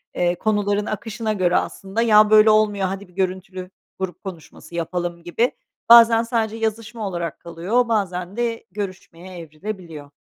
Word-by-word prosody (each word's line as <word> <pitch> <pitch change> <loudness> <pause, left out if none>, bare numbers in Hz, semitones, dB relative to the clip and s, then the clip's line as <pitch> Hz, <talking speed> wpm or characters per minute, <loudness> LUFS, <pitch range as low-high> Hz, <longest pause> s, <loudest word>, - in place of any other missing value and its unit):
eee, 175 0 +1
konuların 205 +1 0
akışına 215 +1 -3
göre 180 -3 +2
aslında, 195 +4 -3
ya, 215 -2 +5
böyle, 215 0 +7
olmuyor, 210 -3 +3
hadi, 195 +1 -6
bir 180 - -23
görüntülü 185 -1 -3 0.3
grup 185 -2 -5
konuşması 175 -2 -10
yapalım 170 0 -3
gibi 225 +8 0 0.4
bazen 230 -1 +8
sadece 225 -2 -1
yazışma 225 0 -3
olarak 170 -3 -4
kalıyor 185 +9 -1
bazen 190 -3 -2
de 235 -1 -2
görüşmeye 185 -2 -7
evrilebiliyor. 165 -2 -8
195 Hz, 140 wpm, -21 LUFS, 180-215 Hz, 0.4 s, bazen